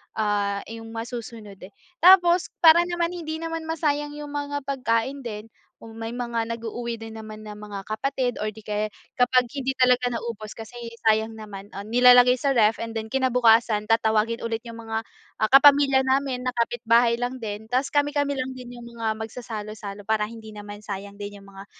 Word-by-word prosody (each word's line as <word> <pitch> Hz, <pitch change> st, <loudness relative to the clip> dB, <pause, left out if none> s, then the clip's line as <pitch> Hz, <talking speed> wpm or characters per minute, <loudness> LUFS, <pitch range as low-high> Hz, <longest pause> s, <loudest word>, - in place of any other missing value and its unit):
ah, 205 Hz, -2 st, 0 dB
yung 225 Hz, 0 st, -8 dB
masusunod, 225 Hz, -3 st, -7 dB
eh. 185 Hz, -, -11 dB, 0.3 s
Tapos 355 Hz, -1 st, +6 dB, 0.2 s
para 325 Hz, 0 st, +9 dB
naman 345 Hz, -1 st, -1 dB
hindi 320 Hz, -2 st, -5 dB
naman 330 Hz, -1 st, -4 dB
masayang 295 Hz, -2 st, -1 dB
yung 295 Hz, -1 st, -7 dB
mga 285 Hz, -1 st, -3 dB
pagkain 265 Hz, 0 st, -1 dB
din, 225 Hz, -3 st, -7 dB, 0.3 s
kung 225 Hz, 0 st, -11 dB
may 225 Hz, +1 st, -5 dB
mga 235 Hz, -2 st, -2 dB
nag-uuwi 230 Hz, +1 st, -4 dB
din 225 Hz, 0 st, -8 dB
naman 215 Hz, -1 st, -9 dB
na 210 Hz, -1 st, -9 dB
mga 210 Hz, -1 st, -7 dB
kapatid 250 Hz, +2 st, -1 dB
or 215 Hz, 0 st, -3 dB
di 220 Hz, -, -12 dB
kaya 210 Hz, 0 st, -2 dB, 0.3 s
kapag 250 Hz, -1 st, +3 dB
hindi 270 Hz, 0 st, -2 dB
talaga 250 Hz, -1 st, +3 dB
naubos 230 Hz, -2 st, -5 dB
kasi 225 Hz, +1 st, -10 dB, 0.3 s
sayang 220 Hz, +1 st, +1 dB
naman, 210 Hz, -2 st, -10 dB
ah, 200 Hz, -, -6 dB
nilalagay 245 Hz, +3 st, +6 dB
sa 275 Hz, +2 st, +1 dB
ref 220 Hz, -3 st, +4 dB
and 230 Hz, 0 st, -5 dB
then 220 Hz, -1 st, -4 dB
kinabukasan, 235 Hz, -4 st, +3 dB
tatawagin 225 Hz, +1 st, +2 dB
ulit 230 Hz, 0 st, -2 dB
yung 230 Hz, -1 st, -10 dB
mga 225 Hz, -1 st, -3 dB, 0.4 s
ah 215 Hz, -, +3 dB
kapamilya 275 Hz, 0 st, +6 dB
namin, 265 Hz, -1 st, 0 dB
na 255 Hz, -, -1 dB
kapitbahay 235 Hz, 0 st, +2 dB
lang 245 Hz, +1 st, -4 dB
din. 210 Hz, -1 st, -5 dB
Tapos 255 Hz, +4 st, 0 dB
kami-kami 290 Hz, -1 st, 0 dB
lang 260 Hz, 0 st, -3 dB
din 245 Hz, -1 st, -10 dB
yung 240 Hz, -, -10 dB
mga 225 Hz, -2 st, -2 dB
magsasalo-salo 215 Hz, -3 st, -7 dB
para 215 Hz, 0 st, 0 dB
hindi 220 Hz, -1 st, -11 dB
naman 205 Hz, 0 st, -10 dB
sayang 200 Hz, 0 st, -6 dB
din 205 Hz, 0 st, -8 dB
yung 200 Hz, -, -16 dB
mga, 195 Hz, 0 st, -11 dB
230 Hz, 180 wpm, -24 LUFS, 215-260 Hz, 0.4 s, para